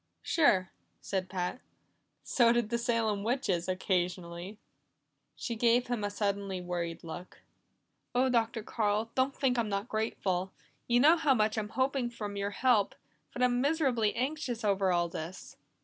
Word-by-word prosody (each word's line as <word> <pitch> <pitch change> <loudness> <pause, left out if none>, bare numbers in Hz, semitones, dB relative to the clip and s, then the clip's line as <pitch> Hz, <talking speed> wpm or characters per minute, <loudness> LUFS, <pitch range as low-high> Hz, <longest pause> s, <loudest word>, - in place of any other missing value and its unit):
"Sure," 190 - +3 0.3
said 190 -2 -3
Pat. 185 +6 -3 0.6
"So 235 -2 +4
did 240 -2 +1
the 235 - +1
Salem 225 -4 0
witches 215 -8 0
occasionally." 180 0 -2 0.8
She 235 - -4
gave 235 +2 +3
him 240 -4 -1
a 205 - 0
suddenly 200 -2 -2
worried 175 -2 -4
look. 175 +2 -9 0.7
"Oh, 255 +2 +4
Dr. 230 -2 +1
Carl, 215 0 0
don't 265 +1 +1
think 250 -3 +1
I'm 225 -2 0
not 200 +2 -2
grateful! 195 -5 -1 0.3
You 240 0 +4
know 315 +5 +7
how 295 -5 +3
much 215 -1 +2
I'm 215 -2 -2
hoping 260 +1 0
from 210 -4 -6
your 200 0 -1
help, 215 -1 +2 0.4
but 250 - -2
I'm 245 0 +3
miserably 270 -7 +1
anxious 255 -2 -2
over 195 -2 +2
all 175 -1 +2
this." 170 +2 -7
220 Hz, 150 wpm, -31 LUFS, 190-245 Hz, 0.8 s, know